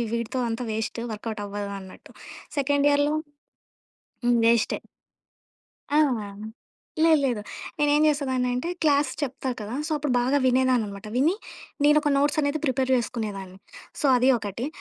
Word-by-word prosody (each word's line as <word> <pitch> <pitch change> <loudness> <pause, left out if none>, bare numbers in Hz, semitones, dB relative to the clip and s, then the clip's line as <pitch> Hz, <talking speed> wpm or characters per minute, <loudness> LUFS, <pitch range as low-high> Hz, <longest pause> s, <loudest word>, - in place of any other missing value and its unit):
వీటితో 235 +2 -2
అంతా 235 +2 -3
waste 220 +1 -3
work out 210 0 -5
అవ్వదు 200 0 -5
అన్నట్టు. 190 -1 -13 0.5
సెకండ్ 285 +1 +2
ఇయర్‌లో 290 +1 +2 1.1
హ్మ్. 240 -1 +4
వేస్టే. 230 -1 +3 1.1
ఆ! 295 - +3 1.0
లేలేదు. 275 -9 +3 0.4
నేనేం 295 +1 +3
చేసేదాన్ని 260 -4 +1
అంటే 250 +7 -2
క్లాస్ 285 -3 +3
చెప్తారు 260 -2 -3
కదా! 210 +4 -5
సో, - - -6
అప్పుడు 290 -3 -1
బాగా 260 +4 +2
వినేదాన్ననమాట. 245 -6 +1
విని 300 +9 +3 0.5
నేనోక 295 0 +4
నోట్స్ 290 +2 +2
అనేది 285 +1 0
ప్రిపేర్ 260 -1 0
చేసుకునేదాన్ని. 210 -6 -4 0.4
సో, - - -6
అది 250 +2 +3
ఒకటి 215 +5 -4
255 Hz, 125 wpm, -25 LUFS, 225-285 Hz, 1.1 s, హ్మ్